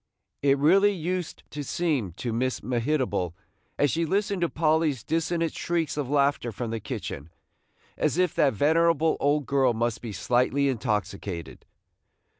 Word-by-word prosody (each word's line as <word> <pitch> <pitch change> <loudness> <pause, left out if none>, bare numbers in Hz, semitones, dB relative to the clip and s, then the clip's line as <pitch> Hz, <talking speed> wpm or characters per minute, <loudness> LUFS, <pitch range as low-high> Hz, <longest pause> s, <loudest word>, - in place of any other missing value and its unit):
It 140 0 +3
really 195 +8 +5
used 180 0 -4
to 145 - -5
seem 140 - -1
to 115 +5 -4
Miss 125 +1 -1
Mehitable, 120 - -1 0.4
as 145 -3 +3
she 165 - 0
listened 200 +3 0
to 170 - +2
Polly's 155 -5 +1
dissonant 165 0 -1
shrieks 170 -2 -1
of 145 -4 -3
laughter 140 -4 +1
from 115 +2 -4
the 115 - -2
kitchen, 75 -6 -6 0.7
as - - +1
if 180 -2 +2
that 135 -3 +3
venerable 160 +4 +3
old 145 +1 +1
girl 135 -3 +2
must 115 0 -1
be 115 - -6
slightly 125 +8 +1
intoxicated. 100 - -3
140 Hz, 145 wpm, -26 LUFS, 120-165 Hz, 0.7 s, really